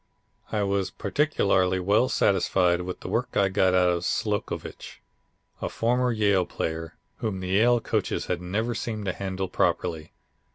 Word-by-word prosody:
I 105 -2 0
was 100 -1 0
particularly 95 - +1
well 105 +7 +2
satisfied 90 -2 +2
with 90 0 -6
the - - -7
work - - -1
I 100 -1 +3
got 95 -1 +2
out 90 -1 +4
of 85 0 -1
Slocovitch, - - -3 0.6
a - - -2
former 125 +2 +1
Yale 100 -5 +2
player, 80 0 -4 0.2
whom 100 -4 -3
the 90 0 -5
Yale 115 +5 +4
coaches - - -1
had 90 -1 -2
never 110 +7 -1
seemed 110 -2 -4
to 90 - -1
handle 95 -1 -3
properly. 85 -3 -1
95 Hz, 155 wpm, -26 LUFS, 90-110 Hz, 0.6 s, out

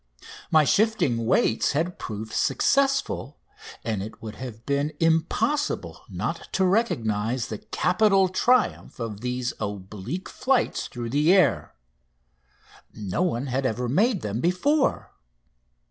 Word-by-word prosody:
My 155 -1 +5
shifting 145 - +2
weights 115 - +2
had 170 +5 -1
proved 110 0 -6
successful, 275 - +1 0.5
and 110 -4 -2
it 105 +3 -8
would 110 -2 -7
have 120 -3 -8
been 140 +2 0
impossible 170 - 0
not - - -4
to 190 - +2
recognise 125 - 0
the 110 - -5
capital 195 -1 +2
triumph 230 - +1
of 110 -3 -5
these 125 0 -2
oblique 105 - -5
flights 260 -1 0
through 120 -1 -6
the 150 +5 +3
air. 190 -1 +3 1.2
No 105 - -3
one 140 -8 0
had 135 0 -1
ever 125 -1 -1
made 200 - +2
them 105 +3 -2
before. 270 - +1
140 Hz, 120 wpm, -25 LUFS, 115-190 Hz, 1.2 s, My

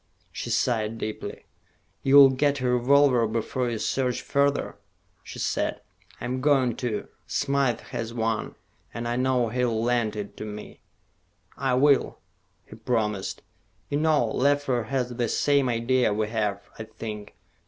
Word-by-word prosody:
She - - -6
sighed 115 -3 0
deeply. 105 -2 -6 0.6
"You 135 +1 +3
will 140 -2 +9
get 140 +1 +1
a 125 - -1
revolver 125 0 +4
before 115 +3 -2
you 115 - -2
search 125 +2 -1
further?" 140 0 0 0.4
she - - -10
said. - - -1 0.4
"I'm 125 +2 -3
going 130 -4 +3
to. 115 -4 -3 0.2
Smythe 140 -4 0
has 115 -1 -4
one, 115 -2 -2 0.4
and 120 0 -3
I 120 - -1
know 125 -2 +1
he'll 120 -1 0
lend 120 -3 +1
it 105 -1 -6
to - - -6
me." 105 0 -8 0.8
"I 130 -2 0
will," 140 +1 +3 0.5
he - - -12
promised. 105 -5 -2 0.5
"You 145 - 0
know, 155 -5 +3
Leffler 130 0 +1
has 125 +1 -1
the 120 -2 0
same 140 -3 +2
idea 120 0 +2
we 105 +1 -1
have, 105 -3 -2
I 110 - -5
think. 110 -2 -8
120 Hz, 145 wpm, -26 LUFS, 110-135 Hz, 0.8 s, will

